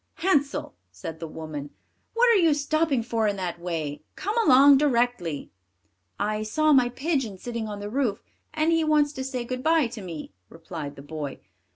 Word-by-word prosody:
"Hansel," 295 Hz, -6 st, 0 dB, 0.2 s
said 125 Hz, -, -8 dB
the 165 Hz, -, -5 dB
woman, 155 Hz, -2 st, -7 dB, 0.5 s
"what 485 Hz, +1 st, +5 dB
are 415 Hz, -5 st, +5 dB
you 320 Hz, -3 st, +4 dB
stopping 295 Hz, -3 st, +1 dB
for 225 Hz, -2 st, 0 dB
in 205 Hz, -, 0 dB
that 180 Hz, -3 st, -4 dB
way? 160 Hz, -4 st, -4 dB
Come 415 Hz, +3 st, -3 dB
along 275 Hz, -2 st, +7 dB
directly." 240 Hz, -, 0 dB, 0.7 s
"I 215 Hz, +1 st, -1 dB
saw 305 Hz, +8 st, +2 dB
my 255 Hz, -3 st, +5 dB
pigeon 265 Hz, -, -2 dB
sitting 230 Hz, +2 st, -4 dB
on 205 Hz, -1 st, -6 dB
the 205 Hz, -, -5 dB
roof, 230 Hz, -3 st, -1 dB, 0.3 s
and 310 Hz, +1 st, +1 dB
he 330 Hz, -1 st, +3 dB
wants 300 Hz, -1 st, +3 dB
to 265 Hz, -, -4 dB
say 255 Hz, -2 st, -3 dB
good 255 Hz, +1 st, -4 dB
bye 320 Hz, 0 st, +3 dB
to 230 Hz, -2 st, -6 dB
me," 165 Hz, -, -7 dB, 0.2 s
replied 165 Hz, -3 st, -7 dB
the 140 Hz, -, -11 dB
boy. 145 Hz, -2 st, -5 dB
240 Hz, 180 wpm, -26 LUFS, -, 0.7 s, along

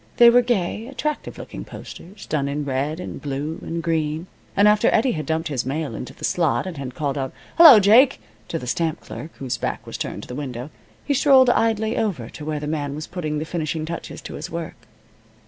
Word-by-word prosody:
They 235 Hz, 0 st, +9 dB
were 245 Hz, +1 st, +6 dB
gay, 225 Hz, -2 st, -1 dB
attractive 295 Hz, +2 st, -4 dB
looking -, -, -8 dB
posters, 195 Hz, +3 st, -11 dB
done 145 Hz, -3 st, -1 dB
in 145 Hz, +1 st, -2 dB
red 140 Hz, +4 st, -1 dB
and -, -, -7 dB
blue 145 Hz, +3 st, -3 dB
and 165 Hz, 0 st, -4 dB
green, 160 Hz, 0 st, -1 dB, 0.3 s
and 200 Hz, +1 st, +6 dB
after 210 Hz, 0 st, +4 dB
Eddie 250 Hz, +3 st, +3 dB
had 155 Hz, -6 st, -4 dB
dumped 160 Hz, 0 st, -1 dB
his 130 Hz, -4 st, -1 dB
mail 140 Hz, 0 st, -3 dB
into 125 Hz, +3 st, -6 dB
the -, -, -15 dB
slot, 165 Hz, -2 st, +1 dB
and 185 Hz, -3 st, -5 dB
had 130 Hz, -2 st, -6 dB
called 145 Hz, -2 st, -2 dB
out, 135 Hz, -1 st, -3 dB, 0.3 s
"Hello, 315 Hz, -9 st, +11 dB
Jake!" 220 Hz, -, +6 dB, 0.3 s
to -, -, -2 dB
the 125 Hz, -, -7 dB
stamp 160 Hz, +5 st, -1 dB
clerk, 155 Hz, -, -8 dB
whose 130 Hz, -3 st, -3 dB
back -, -, -3 dB
was -, -, -7 dB
turned -, -, -4 dB
to -, -, -10 dB
the -, -, -7 dB
window, 130 Hz, 0 st, -5 dB, 0.3 s
he 285 Hz, -, +1 dB
strolled 265 Hz, -2 st, +6 dB
idly 225 Hz, -1 st, +1 dB
over 165 Hz, -, -2 dB
to 150 Hz, -, -10 dB
where 150 Hz, 0 st, -2 dB
the 150 Hz, -, -5 dB
man 145 Hz, -2 st, -2 dB
was 155 Hz, +1 st, -5 dB
putting 160 Hz, -4 st, -3 dB
the 155 Hz, -, -3 dB
finishing 160 Hz, -1 st, -3 dB
touches 170 Hz, +1 st, -6 dB
to -, -, -7 dB
his 160 Hz, +3 st, -6 dB
work. 165 Hz, -1 st, -5 dB
160 Hz, 215 wpm, -22 LUFS, 145-210 Hz, 0.3 s, Hello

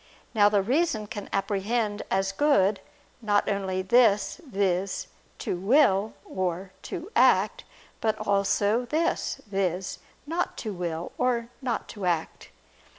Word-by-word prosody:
Now 205 Hz, -2 st, +5 dB
the 205 Hz, -2 st, +2 dB
reason 250 Hz, -, +1 dB
can 205 Hz, -1 st, -7 dB
apprehend 205 Hz, +2 st, -1 dB
as 195 Hz, 0 st, +1 dB
good, 200 Hz, -5 st, +3 dB, 0.4 s
not 205 Hz, -2 st, +2 dB
only 190 Hz, -2 st, -1 dB
this, 230 Hz, -, +3 dB
viz. 195 Hz, -3 st, 0 dB, 0.3 s
"to -, -, -3 dB
will" 210 Hz, 0 st, +3 dB
or 185 Hz, 0 st, -3 dB, 0.2 s
"to 370 Hz, +2 st, -6 dB
act," -, -, +4 dB, 0.3 s
but 220 Hz, -1 st, 0 dB
also 205 Hz, +3 st, +2 dB
this, 315 Hz, +7 st, -1 dB
viz. 190 Hz, -2 st, -2 dB, 0.3 s
"not 335 Hz, +4 st, -2 dB
to 215 Hz, -3 st, -4 dB
will" 170 Hz, -2 st, -4 dB
or 240 Hz, -2 st, +1 dB
"not 250 Hz, -3 st, -2 dB
to 200 Hz, -4 st, -4 dB
act." 165 Hz, -2 st, -2 dB
205 Hz, 125 wpm, -27 LUFS, 190-240 Hz, 0.4 s, Now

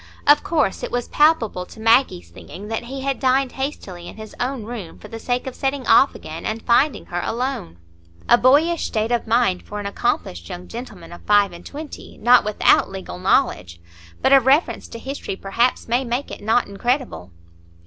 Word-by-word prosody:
Of 290 Hz, +1 st, +6 dB
course 295 Hz, -, 0 dB
it -, -, -4 dB
was 245 Hz, 0 st, -3 dB
palpable 295 Hz, -, +2 dB
to -, -, -14 dB
Maggie's 225 Hz, -, +2 dB
thinking 200 Hz, -, -10 dB
that 225 Hz, +1 st, -3 dB
he 265 Hz, +2 st, -6 dB
had 275 Hz, 0 st, -2 dB
dined 260 Hz, 0 st, +2 dB
hastily 195 Hz, -11 st, -6 dB
in -, -, -10 dB
his 220 Hz, -1 st, -10 dB
own 250 Hz, -1 st, -2 dB
room 210 Hz, -7 st, -8 dB
for -, -, -12 dB
the 225 Hz, -, -7 dB
sake 245 Hz, +1 st, -2 dB
of 265 Hz, -, -5 dB
setting 270 Hz, 0 st, -2 dB
off 275 Hz, -, +5 dB
again 160 Hz, +1 st, -8 dB
and 220 Hz, +1 st, -3 dB
finding 270 Hz, +4 st, +2 dB
her 175 Hz, 0 st, -4 dB
alone. 235 Hz, -, -3 dB, 0.5 s
A 240 Hz, -, +7 dB
boyish 295 Hz, +7 st, +3 dB
state 220 Hz, +1 st, -2 dB
of 240 Hz, -1 st, 0 dB
mind 225 Hz, -5 st, +2 dB
for 210 Hz, -, -7 dB
an 205 Hz, -, -6 dB
accomplished 90 Hz, -, -2 dB
young 180 Hz, +1 st, -8 dB
gentleman 215 Hz, -8 st, -9 dB
of 175 Hz, -, -11 dB
five 205 Hz, -2 st, +4 dB
and 175 Hz, 0 st, -11 dB
twenty, 300 Hz, +1 st, -9 dB
not 245 Hz, +2 st, +5 dB
without 210 Hz, 0 st, +3 dB
legal 190 Hz, -2 st, -8 dB
knowledge! 90 Hz, -, +1 dB, 0.4 s
But 270 Hz, -, +4 dB
a 275 Hz, -, +9 dB
reference 270 Hz, +6 st, +2 dB
to -, -, -9 dB
history, 265 Hz, -4 st, -5 dB
perhaps, 230 Hz, +6 st, 0 dB
may 240 Hz, +3 st, +1 dB
make 245 Hz, +3 st, -3 dB
it -, -, -8 dB
not 225 Hz, +4 st, +2 dB
incredible. 240 Hz, -, -2 dB
235 Hz, 190 wpm, -21 LUFS, 200-265 Hz, 0.5 s, a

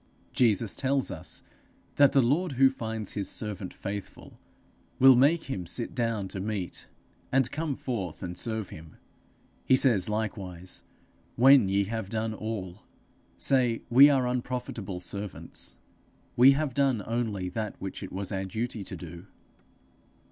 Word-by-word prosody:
Jesus 115 Hz, -4 st, +2 dB
tells 135 Hz, -1 st, 0 dB
us -, -, -6 dB, 0.5 s
that 140 Hz, -1 st, +6 dB
the 135 Hz, -, +4 dB
lord 150 Hz, +7 st, +1 dB
who 135 Hz, +1 st, +5 dB
finds 110 Hz, -4 st, -4 dB
his 100 Hz, -2 st, -2 dB
servant 100 Hz, -4 st, -4 dB
faithful, 100 Hz, -1 st, -8 dB, 0.6 s
will 130 Hz, 0 st, +8 dB
make 150 Hz, +6 st, +4 dB
him 95 Hz, -11 st, -5 dB
sit 115 Hz, +7 st, -3 dB
down 115 Hz, -5 st, -1 dB
to 95 Hz, -, -6 dB
meat, 100 Hz, -3 st, -4 dB, 0.4 s
and 130 Hz, -1 st, +2 dB
come 155 Hz, -2 st, -2 dB
forth 100 Hz, -, -4 dB
and 90 Hz, -1 st, -5 dB
serve 110 Hz, -1 st, -3 dB
him; 80 Hz, 0 st, -12 dB, 0.7 s
he 130 Hz, -, +4 dB
says 115 Hz, -8 st, +3 dB
likewise, 95 Hz, -4 st, -4 dB, 0.5 s
'When 130 Hz, -4 st, +6 dB
ye 100 Hz, +1 st, +2 dB
have 110 Hz, -1 st, -4 dB
done 110 Hz, 0 st, -2 dB
all, 105 Hz, -4 st, -5 dB, 0.6 s
say 125 Hz, -4 st, +2 dB
we 135 Hz, +4 st, +9 dB
are 135 Hz, -3 st, +2 dB
unprofitable 125 Hz, -6 st, -3 dB
servants; 100 Hz, +2 st, -5 dB, 0.6 s
we 130 Hz, +3 st, +8 dB
have 145 Hz, -2 st, -1 dB
done 135 Hz, -6 st, +1 dB
only 110 Hz, -5 st, -2 dB
that 105 Hz, 0 st, -5 dB
which 95 Hz, -, -6 dB
it 95 Hz, -, -7 dB
was 95 Hz, +1 st, -4 dB
our 95 Hz, -1 st, -2 dB
duty 110 Hz, +2 st, -4 dB
to -, -, -7 dB
do.' 85 Hz, +2 st, -10 dB
110 Hz, 145 wpm, -28 LUFS, 95-130 Hz, 0.7 s, we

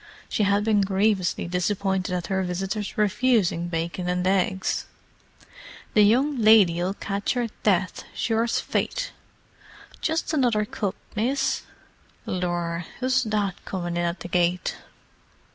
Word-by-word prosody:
She -, -, -1 dB
had 200 Hz, 0 st, +3 dB
been 215 Hz, -2 st, +3 dB
grievously 195 Hz, -2 st, +1 dB
disappointed 185 Hz, +1 st, 0 dB
at 175 Hz, -1 st, -3 dB
her 190 Hz, -1 st, 0 dB
visitors' 195 Hz, +3 st, -3 dB
refusing 210 Hz, -5 st, +2 dB
bacon 170 Hz, +1 st, -3 dB
and 180 Hz, 0 st, 0 dB
eggs. 190 Hz, 0 st, 0 dB, 1.1 s
"The 210 Hz, -, +5 dB
young 255 Hz, +7 st, +3 dB
lady'll 195 Hz, -4 st, +5 dB
catch 200 Hz, +5 st, -2 dB
'er 240 Hz, -2 st, 0 dB
death, 190 Hz, -3 st, +1 dB
sure's 230 Hz, +1 st, +1 dB
fate! -, -, -2 dB, 0.9 s
Just 320 Hz, 0 st, -1 dB
another 240 Hz, -7 st, +2 dB
cup, 205 Hz, -2 st, -3 dB, 0.2 s
miss. 265 Hz, +5 st, 0 dB, 0.6 s
Lor, 175 Hz, -2 st, -2 dB
who's 255 Hz, +1 st, +2 dB
that 205 Hz, -3 st, -1 dB
comin' 175 Hz, -2 st, -4 dB
in 175 Hz, -, 0 dB
at 170 Hz, +1 st, -3 dB
the -, -, -5 dB
gate!" 175 Hz, 0 st, +1 dB
195 Hz, 125 wpm, -25 LUFS, 180-220 Hz, 1.1 s, The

